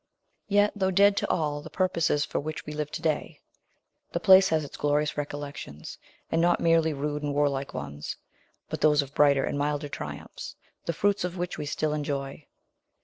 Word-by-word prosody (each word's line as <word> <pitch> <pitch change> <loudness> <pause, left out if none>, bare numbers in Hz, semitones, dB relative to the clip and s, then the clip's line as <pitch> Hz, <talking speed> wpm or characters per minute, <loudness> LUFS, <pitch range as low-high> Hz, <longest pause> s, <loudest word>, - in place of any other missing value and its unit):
Yet, 205 0 +4
though 190 -2 +1
dead 200 +2 +5
to - - 0
all 150 -3 0
the - - -10
purposes 170 -5 +1
for - - -2
which 155 +2 -5
we 150 - -6
live 150 -1 -3
to 165 - -5
day, 155 -2 -1 0.7
the - - 0
place 190 -1 +7
has 155 -2 +1
its - - -10
glorious 150 +1 +1
recollections, 145 - -6 0.3
and 165 - +2
not 175 +1 +3
merely 165 -1 +3
rude 150 +1 -3
and 145 -1 -2
warlike 140 -1 0
ones, 70 +1 -5 0.5
but - - -5
those 150 -1 +5
of 140 0 -12
brighter 140 -2 +4
and 145 - -2
milder 145 0 -1
triumphs, - - -7 0.3
the 170 - -1
fruits 205 +3 +1
of 180 0 -3
which 175 0 -3
we 150 - -4
still 150 +1 -1
enjoy. 140 -1 -4
150 Hz, 185 wpm, -27 LUFS, 145-170 Hz, 0.7 s, place